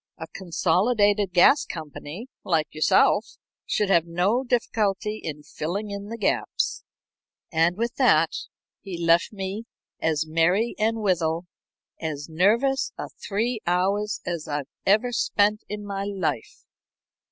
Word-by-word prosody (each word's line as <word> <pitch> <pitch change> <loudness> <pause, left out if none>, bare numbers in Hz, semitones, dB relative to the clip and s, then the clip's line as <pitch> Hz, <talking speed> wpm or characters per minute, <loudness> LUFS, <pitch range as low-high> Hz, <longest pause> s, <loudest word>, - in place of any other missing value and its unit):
A 160 - -6
consolidated 200 +3 +2
gas 180 +11 +6
company, 155 - -7 0.2
like 160 -3 +1
yourself, 155 - +3 0.3
should 205 -2 +1
have 170 -2 +4
no 185 +9 +1
difficulty 215 -4 0
in 150 -2 -5
filling 190 +7 -4
in 200 0 -6
the 230 +2 -6
gaps." 210 - -1 0.7
And 165 +2 +2
with 235 +1 -2
that 165 - +4 0.5
he 190 -3 -6
left 170 0 +3
me 195 0 -4 0.4
to - - +1
as 155 -1 +1
merry 175 +8 +2
and 220 +1 +1
withal 170 -3 +1 0.5
as 150 -3 -4
nervous 225 +12 +2
a - - -5
three 225 +3 -2
hours 195 +4 +1
as 170 -3 -3
I 145 -1 -2 0.2
ever 215 +5 +4
spent 210 -2 +2
in 210 0 -5
my 200 -1 -3
life. 190 - -3
195 Hz, 130 wpm, -25 LUFS, 165-210 Hz, 0.7 s, gas